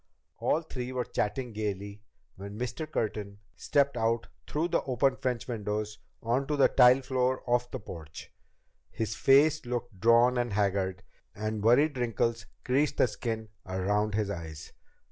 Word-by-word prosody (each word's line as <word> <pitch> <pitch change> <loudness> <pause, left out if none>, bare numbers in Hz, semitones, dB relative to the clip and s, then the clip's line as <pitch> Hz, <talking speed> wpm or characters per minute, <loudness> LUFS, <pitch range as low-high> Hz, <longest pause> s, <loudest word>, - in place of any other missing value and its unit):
All 165 - +1
three 125 -5 -5
were 125 -1 -2
chatting 115 +3 -2
gaily 100 -1 -4 0.3
when 100 +2 -8
Mr. 125 +6 -4
Curtin 105 -5 -3 0.2
stepped 140 -1 +1
out 115 0 0 0.2
through 160 +4 -1
the - - +2
open 130 +1 +2
French 125 -3 -2
windows 105 -2 -3 0.2
onto 135 +6 0
the 140 - +5
tile 125 +1 +6
floor 130 0 0
of 120 0 +1
the - - -5
porch. 80 -6 -10 0.6
His 110 -2 -3
face 145 +5 +4
looked 120 -4 -4
drawn 120 +4 +5
and 120 -3 -1
haggard, 95 -2 0 0.3
and 110 0 -3
worried 135 +5 +4
wrinkles 115 -2 -1 0.2
creased 140 +4 +1
the - - +5
skin 110 -3 -4 0.2
around 100 +3 0
his 105 -2 0
eyes. 80 -5 -7
115 Hz, 145 wpm, -29 LUFS, 105-125 Hz, 0.6 s, tile